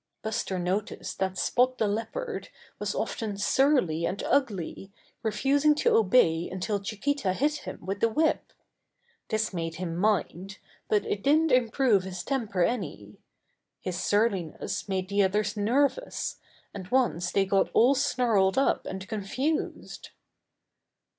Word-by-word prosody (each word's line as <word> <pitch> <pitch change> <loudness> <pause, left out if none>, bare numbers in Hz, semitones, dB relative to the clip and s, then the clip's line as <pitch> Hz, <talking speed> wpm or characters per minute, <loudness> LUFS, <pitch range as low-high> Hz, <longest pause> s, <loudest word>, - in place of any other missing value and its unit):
Buster 220 -3 -2
noticed 185 +4 -3
that 190 0 -1
Spot 255 +6 +2
the 220 - +1
Leopard 230 - -4 0.3
was - - -2
often 215 -4 -3
surly 205 - +2
and 185 +4 -2
ugly, 200 - -1 0.3
refusing 275 +7 +2
to - - +2
obey 185 -6 +3
until 190 +3 -2
Chiquita 215 +1 -1
hit 295 +8 0
him - - -7
with 195 +2 -3
the 230 - +3
whip. 310 +7 0 0.8
This 220 -2 0
made 165 -2 -3
him 175 -2 -4
mind, 195 0 -1 0.3
but 210 - +2
it 200 - -2
didn't 310 +5 +3
improve 245 -3 +3
his 185 -1 -6
temper 220 -10 -1
any. 245 +7 -3 0.6
His 180 -2 -4
surliness 200 -2 -1
made 190 -1 -1
the 200 +1 +1
others 205 +2 +1
nervous, 275 - 0 0.4
and 190 -3 -7
once 210 -8 +1
they 195 - +2
got 195 0 +2
all 245 +5 +6
snarled 235 -8 +2
up 270 - +1
and 190 0 -6
confused. 235 +9 -3
210 Hz, 135 wpm, -27 LUFS, 190-255 Hz, 0.8 s, all